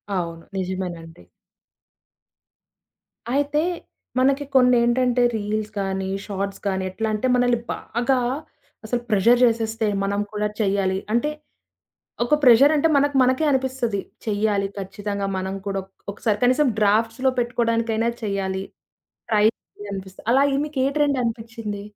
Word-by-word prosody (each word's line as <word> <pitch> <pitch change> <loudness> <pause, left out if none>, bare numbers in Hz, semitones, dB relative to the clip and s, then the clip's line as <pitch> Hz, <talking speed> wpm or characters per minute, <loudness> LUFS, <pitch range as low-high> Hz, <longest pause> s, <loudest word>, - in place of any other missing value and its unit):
అవును. 170 -2 -3
నిజమేనండి. 175 - -5 2.1
అయితే 290 +1 +1 0.6
మనకి 275 +2 +3
కొన్ని 250 -1 +6
ఏంటంటే 245 +1 +2
రీల్స్‌గాని 205 -2 -2 0.2
షార్ట్స్ 200 -1 -4
గానీ 190 -1 -1
ఎట్లాంటే 215 +4 -1
మనల్ని 245 -1 +2
బాగా 250 +3 -1 0.7
అసలు 240 +2 -1
ప్రెషర్ 230 +4 +4
చేసేస్తే 225 -1 0 0.2
మనం 200 +1 -1
కూడా 210 0 0
చెయాలి 195 -2 +1 0.2
అంటే 240 +6 +2 1.0
ఒక 270 - +3
ప్రెషరంటే 285 +5 +6
మనకు 285 0 +2
మనకే 260 +5 +2
అనిపిస్తది. 260 -6 0 0.3
చెయ్యాలి 205 -1 +1
ఖచ్చితంగా 200 +1 -4
మనం 190 +1 -3
కూడా 195 -1 -1
ఒక్ 190 - -27 0.2
ఒకసారి 210 0 -1
కనీసం 255 +4 +4
డ్రాఫ్ట్స్‌లో 225 +5 +2
పెట్టుకోవడానికైనా 230 -1 0
చెయ్యాలి. 195 -2 -2 0.7
ట్రై 210 -1 +3 0.5
అనిపిస్తది. 190 +1 -8
అలాగ 275 +1 +3
మీకే 270 -3 -1
ట్రెండ్ 285 -3 +2
అనిపించింది? 225 -3 -4
220 Hz, 110 wpm, -23 LUFS, 200-250 Hz, 2.1 s, కొన్ని